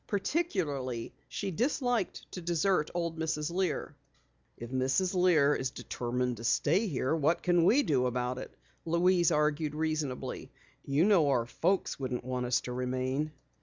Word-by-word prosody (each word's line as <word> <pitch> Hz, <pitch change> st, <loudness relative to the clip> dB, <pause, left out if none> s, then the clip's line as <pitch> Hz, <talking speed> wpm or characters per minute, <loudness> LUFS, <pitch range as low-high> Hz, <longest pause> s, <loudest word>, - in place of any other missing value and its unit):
Particularly 165 Hz, -, -2 dB
she 200 Hz, -1 st, -4 dB
disliked 245 Hz, -, -1 dB
to 180 Hz, -, -6 dB
desert 170 Hz, -1 st, +1 dB
old 170 Hz, -2 st, -2 dB
Mrs. 155 Hz, -1 st, -1 dB
Lear. 175 Hz, -5 st, -1 dB, 0.6 s
"If 120 Hz, +1 st, -8 dB
Mrs. 135 Hz, +9 st, +1 dB
Lear 170 Hz, -6 st, +4 dB
is 130 Hz, -2 st, -1 dB
determined 125 Hz, 0 st, -3 dB
to 115 Hz, -, -9 dB
stay 170 Hz, -, +2 dB
here, 140 Hz, -2 st, 0 dB
what 160 Hz, +2 st, +1 dB
can 175 Hz, -2 st, +3 dB
we 270 Hz, +10 st, +5 dB
do 130 Hz, -, +2 dB
about 125 Hz, +1 st, -2 dB
it?" -, -, -8 dB, 0.3 s
Louise 170 Hz, +1 st, +3 dB
argued 150 Hz, 0 st, +1 dB
reasonably. 155 Hz, -4 st, -3 dB, 0.3 s
"You 140 Hz, +5 st, +2 dB
know 190 Hz, -8 st, +5 dB
our 125 Hz, -4 st, +2 dB
folks 180 Hz, +10 st, 0 dB
wouldn't 125 Hz, -2 st, -3 dB
want 125 Hz, -1 st, -2 dB
us 120 Hz, -, +2 dB
to 125 Hz, -, -6 dB
remain." 130 Hz, +4 st, -1 dB
150 Hz, 150 wpm, -30 LUFS, 130-180 Hz, 0.6 s, we